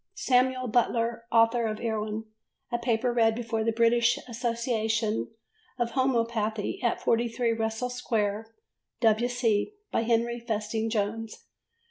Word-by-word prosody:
Samuel 255 0 +2
Butler 230 0 +1
Author 230 0 +4
of 215 -1 -3
Erewhon, 220 -1 -2 0.5
a 240 - 0
Paper 240 0 0
read 225 -2 +3
before 225 -1 -2
the 230 - +1
British 235 +1 +3
Association 230 -2 -1 0.5
of 240 -2 -1
Homœopathy 230 -4 0
at 235 - +1
43 235 +1 +1
Russell 225 +2 -2
Square, 220 -3 -1 0.5
W.C., 230 - +2 0.2
by - - +1
Henry 235 +1 +1
Festing 220 -1 -2
Jones. 220 +1 -3
230 Hz, 115 wpm, -28 LUFS, 220-240 Hz, 0.5 s, Author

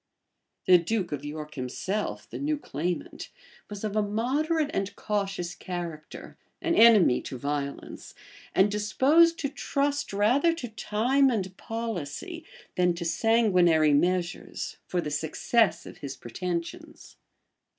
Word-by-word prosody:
The 180 -1 +7
duke 185 +1 -2
of 145 -1 -4
York 150 +1 -6
himself, 170 +11 -3
the - - -7
new 300 +1 0
claimant, 175 - -4 0.4
was 205 0 -7
of 210 -1 -3
a 215 - +3
moderate 285 +9 0
and 195 +1 -2
cautious 195 -4 -2
character, 170 -5 -7 0.2
an 335 - 0
enemy 215 - +6
to 130 - -7
violence 140 +1 -5 0.4
and 195 +2 +4
disposed 280 +11 +4
to 280 - -2
trust 285 0 -1
rather 250 +12 +3
to 250 -8 -6
time 245 +6 +2
and 190 -6 -2
policy, 225 - -5 0.3
than 180 -1 +3
to 170 0 -5
sanguinary 175 -5 +3
measures, 175 +3 -1
for 180 - -1
the 150 - -5
success 160 +9 +1
of - - -11
his 140 -1 -6
pretensions. 180 - -6
200 Hz, 130 wpm, -27 LUFS, 170-240 Hz, 0.4 s, The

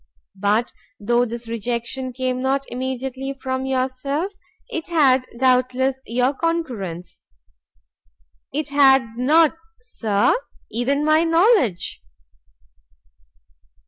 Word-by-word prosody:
But 210 +4 0 0.3
though 240 +4 +2
this 235 0 -7
rejection 235 +3 -3
came 255 0 -2
not 270 +1 0
immediately 260 +1 -4
from 260 0 -4
yourself, 265 +7 -2 0.3
it 325 - -5
had 270 -7 +3
doubtless 255 +1 +2
your 250 +4 +1
concurrence." 245 - -3 1.3
"It 295 +1 -3
had 270 -2 +5
not, 300 +6 +4 0.2
Sir, 220 - +1 0.4
even 270 +6 0
my 310 +1 +4
knowledge." 330 - +2
260 Hz, 90 wpm, -21 LUFS, 240-280 Hz, 1.3 s, had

